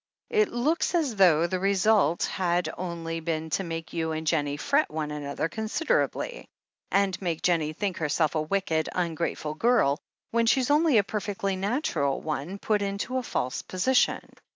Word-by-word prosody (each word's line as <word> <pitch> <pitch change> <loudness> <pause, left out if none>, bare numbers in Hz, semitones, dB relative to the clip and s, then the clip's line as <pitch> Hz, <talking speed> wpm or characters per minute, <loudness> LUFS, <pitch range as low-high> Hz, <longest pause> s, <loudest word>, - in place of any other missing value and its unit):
It 430 -2 +3
looks 305 +9 0
as 295 -9 +1
though 170 -4 +5
the 185 +1 -1
result 195 -3 +3
had 175 -1 0
only 165 -2 -4
been 160 -1 -3
to 195 - 0
make 165 -2 -6
you 160 -1 -1
and 160 0 -4
Jennie 145 -3 0
fret 285 - +1
one 155 -1 -3
another 145 +1 -3
con 220 +7 -5
siderably, 330 - -1 0.4
and 195 -1 +1
make 170 -4 -2
Jennie 160 -3 +1
think 195 +2 -2
herself 155 0 +1
a 155 - 0
wicked, 160 -1 0
un 175 -2 0
grateful 155 -1 -3
girl, 155 - +2 0.3
when 230 0 +2
she's 260 +3 +3
only 300 -3 +4
a 205 - +5
perfectly 200 -1 -2
natural 190 - 0
one 155 +5 -4
put 210 0 0
into 200 +6 -2
a - - 0
false 130 - -2
position. 225 +8 +1
185 Hz, 170 wpm, -27 LUFS, 160-220 Hz, 0.4 s, though